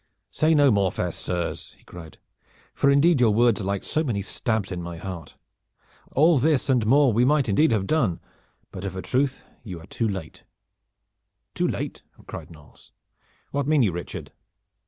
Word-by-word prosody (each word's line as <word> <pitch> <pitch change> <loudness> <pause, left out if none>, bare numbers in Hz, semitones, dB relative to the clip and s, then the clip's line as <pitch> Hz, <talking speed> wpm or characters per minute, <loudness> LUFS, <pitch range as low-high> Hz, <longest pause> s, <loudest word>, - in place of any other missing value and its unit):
"Say 160 +1 +2
no 145 -3 +5
more, 100 -3 +2
fair 90 -2 -2
sirs," 85 0 -4
he - - -26
cried; 80 -3 -12 0.6
"for 140 - +2
indeed 140 +1 +4
your 120 - +5
words 115 -1 +3
are - - -4
like 100 0 -2
so 155 - -1
many 110 -9 -2
stabs 110 -1 -2
in 90 -1 -4
my 85 -1 -7
heart. 85 -2 -8 0.8
All 155 +1 +4
this 145 0 +2
and 125 -3 +2
more 135 0 +5
we 120 +3 +3
might 140 0 +3
indeed 125 +8 +3
have 105 -4 +1
done. 115 - +1 0.5
But 90 - -8
of 95 -2 -4
a 95 - -5
truth 135 +1 -1 0.2
you 95 -7 -7
are 80 - -13
too 115 +4 -2
late." 95 -6 -7 1.1
"Too - - 0
late?'" - - -4 0.2
cried - - -8
Knolles. 75 -3 -17 0.6
"What 140 -1 -1
mean 150 -3 +4
you, 100 - +2
Richard?" 85 +1 -7
110 Hz, 175 wpm, -24 LUFS, 95-140 Hz, 1.1 s, no